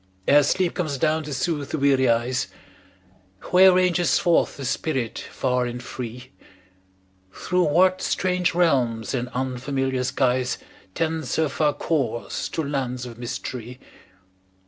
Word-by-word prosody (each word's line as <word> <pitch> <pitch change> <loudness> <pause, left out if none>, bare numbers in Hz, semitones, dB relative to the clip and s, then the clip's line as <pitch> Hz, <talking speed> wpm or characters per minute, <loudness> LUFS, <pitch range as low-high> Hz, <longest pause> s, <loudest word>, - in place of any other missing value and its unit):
Ere 145 +1 +7
sleep 180 +4 +1
comes 155 -6 -2
down 155 +3 +1
to 150 -1 -7
soothe 145 0 -2
the - - -2
weary 135 -3 +3
eyes, 120 +3 +1 1.0
Where 185 +1 +8
ranges 180 -1 +3
forth 175 -2 +2
the 140 - -6
spirit 135 -3 -2
far 125 -1 -1
and 120 0 -5
free? 125 0 -7 1.0
Through 180 - 0
what 185 +5 +3
strange 180 -2 0
realms 125 -11 +1
and 125 -1 -2
unfamiliar 130 0 -1
skies. 130 -1 0 0.4
Tends 160 -1 -1
her 160 -2 +1
far 150 +1 +1
course 130 -8 -2
to 160 - -2
lands 130 -3 -3
of 120 -1 -10
mystery? 125 0 -6
135 Hz, 130 wpm, -24 LUFS, 125-160 Hz, 1.0 s, Where